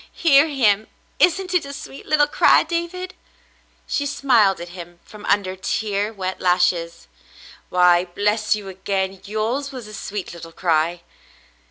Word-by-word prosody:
"Hear 290 -2 +5
him. 220 -8 +2 0.3
Isn't 365 +1 +2
it 360 - +2
a 280 - -8
sweet 280 -1 -10
little 300 -1 +4
cry, 295 - +4
David 345 +3 -4
.f^" - - -30 0.7
She 285 - -1
smiled 235 -9 +3
at 175 +1 -7
him 175 -1 -11
from 210 -1 -12
under 195 -2 +1
tear 205 +2 -2
wet 190 -3 -5
lashes. 180 -2 +1 0.6
"Why, 180 0 +4
bless 210 +4 0
you 205 -2 -8
again! 190 0 -3
Yours 230 +7 -2
was 255 -4 -8
a 215 - -11
sweet 200 -3 -6
little 165 -1 -11
cry." 170 0 0
205 Hz, 150 wpm, -21 LUFS, 180-275 Hz, 0.7 s, Hear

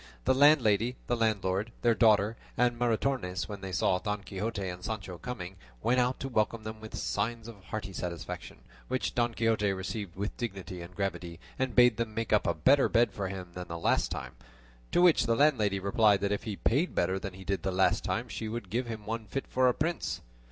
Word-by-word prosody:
The - - +4
landlady, 125 -5 +4
the 120 - 0
landlord, 110 -2 0
their 120 - +5
daughter, 110 -1 +4 0.2
and 120 0 +3
Maritornes, 120 -6 0
when 100 -2 -7
they 95 -1 -5
saw 90 0 +2
Don 105 -1 -3
Quixote 100 0 -3
and 90 0 -6
Sancho 95 -5 -5
coming, 95 -7 -6 0.3
went 125 +1 +3
out 125 +1 +1
to 135 - -2
welcome 110 -2 0
them 110 0 -6
with 110 - -7
signs 115 +2 -2
of 105 -5 -12
hearty 100 -3 -5
satisfaction, 85 -2 -6 0.3
which 130 0 -1
Don 120 -1 0
Quixote 110 -3 +2
received 95 0 -5
with 100 +3 -3
dignity 95 -6 -5
and 85 +1 -10
gravity, 85 -4 -3 0.2
and 130 -3 -1
bade 125 -3 +6
them 115 -2 -3
make 115 -1 -1
up - - +3
a - - +1
better 135 - +4
bed 120 0 +3
for 100 -2 -3
him 95 -1 -6
than 90 0 -6
the 85 - -5
last 85 - +1
time: - - -5 0.6
to 175 - +4
which 170 -9 +5
the 115 - +3
landlady 110 -9 +3
replied 100 +1 +3
that 100 - 0
if 105 - -2
he 105 -3 -3
paid 140 - +1
better 95 +2 +1
than 95 -2 -6
he 95 - -10
did 100 +1 -1
the 95 - -1
last 95 +1 +2
time - - -2
she 110 - -5
would 110 -4 -5
give 120 +3 -1
him 110 -2 -6
one 110 0 -4
fit 135 - -3
for 130 0 +2
a 125 - +4
prince. 165 +3 -2
110 Hz, 215 wpm, -30 LUFS, 95-120 Hz, 0.6 s, bade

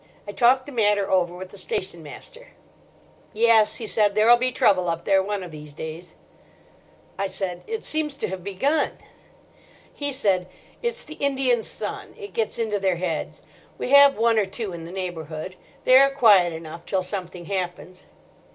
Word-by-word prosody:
I - - -4
talked 245 +6 +3
the 290 - -9
matter 210 -5 +1
over 180 -2 +2
with 185 +1 -8
the 200 - -9
station 185 -2 -3
master. 310 - -12 0.8
"'Yes,' 225 -1 +4
he 230 - -6
said, 210 -2 +2
'there'll 220 +3 +6
be 255 +1 0
trouble 185 -7 +2
up 170 0 -3
there 195 -1 +4
one 200 0 -3
of 175 - -9
these 150 -1 -11
days.' 160 +3 -7 1.0
"I 195 - 0
said, 180 -2 -4
'It 450 0 -4
seems 310 -2 -1
to - - -2
me - - -4
to 190 - -3
have 180 - -13
begun.' 275 - 0 1.0
"He 285 -1 -3
said, 195 -9 0 0.3
'It's 475 0 -2
the 310 +1 -11
Indian 260 -4 +1
sun. - - -7
It 410 -2 -9
gets 225 -2 -2
into 220 -3 -1
their 190 -2 +1
heads. 170 -3 -4 0.3
We 250 - -4
have 280 -2 +7
one 230 0 +3
or 200 - 0
two 195 0 -5
in 165 -1 -7
the 170 - -9
neighbourhood. 175 -2 -5 0.3
They 255 +1 +7
are 275 0 +6
quiet 210 -10 +5
enough 165 +1 -8
till 190 -2 0
something 180 -2 -4
happens. 185 0 -5
200 Hz, 180 wpm, -24 LUFS, 180-240 Hz, 1.0 s, have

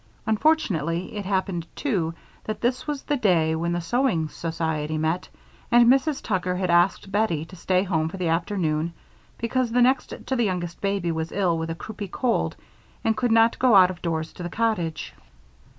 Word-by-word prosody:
Unfortunately 210 - +1
it 205 -2 -4
happened, 190 -4 -1
too, 175 - -1 0.3
that 215 - -4
this 250 +4 -1
was 290 -2 -3
the 290 - 0
day 170 -9 +2
when 170 +1 -1
the 175 - 0
sewing 175 - +1
society 160 -2 -2
met, 160 +3 -1 0.4
and 240 0 +6
Mrs. 275 +2 +1
Tucker 185 -4 -1
had 180 -1 0
asked 175 +3 +2
Bettie 195 -7 +1
to 185 - -13
stay 185 +1 +1
home 160 -5 0
for 195 - -7
the 180 -2 -1
afternoon 165 -2 0 0.4
because 240 +1 -1
the 245 - +2
next 260 +2 +2
to 265 - -1
the 240 -2 +2
youngest 175 -3 -3
baby 195 -4 0
was 160 0 -3
ill 185 -4 +1
with 165 0 -3
a 165 - -3
croupy 205 +5 -7
cold 240 +6 0 0.5
and 225 -1 +2
could 240 +2 0
not 225 +1 +4
go 250 -4 +5
out 185 -1 +7
of 180 - -11
doors 160 -2 -2
to - - -10
the 175 - -4
cottage. 180 -8 -1
185 Hz, 185 wpm, -24 LUFS, 165-225 Hz, 0.5 s, out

